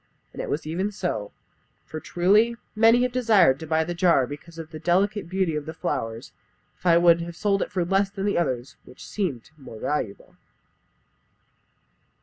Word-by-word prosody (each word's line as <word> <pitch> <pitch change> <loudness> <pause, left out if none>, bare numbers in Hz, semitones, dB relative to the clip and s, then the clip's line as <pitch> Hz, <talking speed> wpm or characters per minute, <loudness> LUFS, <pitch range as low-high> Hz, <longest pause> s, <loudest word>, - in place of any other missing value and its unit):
And - - -5
it - - -5
was 150 +2 -2
even 180 +6 -2
so; 140 - -3 0.5
for 155 - -7
truly, 205 +9 +2 0.2
many 230 +3 +5
have 250 - 0
desired 215 - +4
to 160 - -8
buy 160 +1 +2
the 175 +2 -4
jar 170 -6 +3
because 150 +5 -10
of 165 -1 -8
the 155 - -7
delicate 190 +3 +1
beauty 185 -4 0
of 150 0 -4
the 160 - -6
flowers, 115 -10 -4 0.4
if - - -6
I 170 -1 +6
would 170 -1 +5
have 170 0 -6
sold 200 +1 +1
it - - -3
for 185 -4 0
less 195 +2 +2
than 200 0 -2
others 130 -5 -2
which - - -13
seemed 150 - -4
more 130 -5 -10
valuable." 115 -9 -3
170 Hz, 175 wpm, -25 LUFS, 155-195 Hz, 0.5 s, I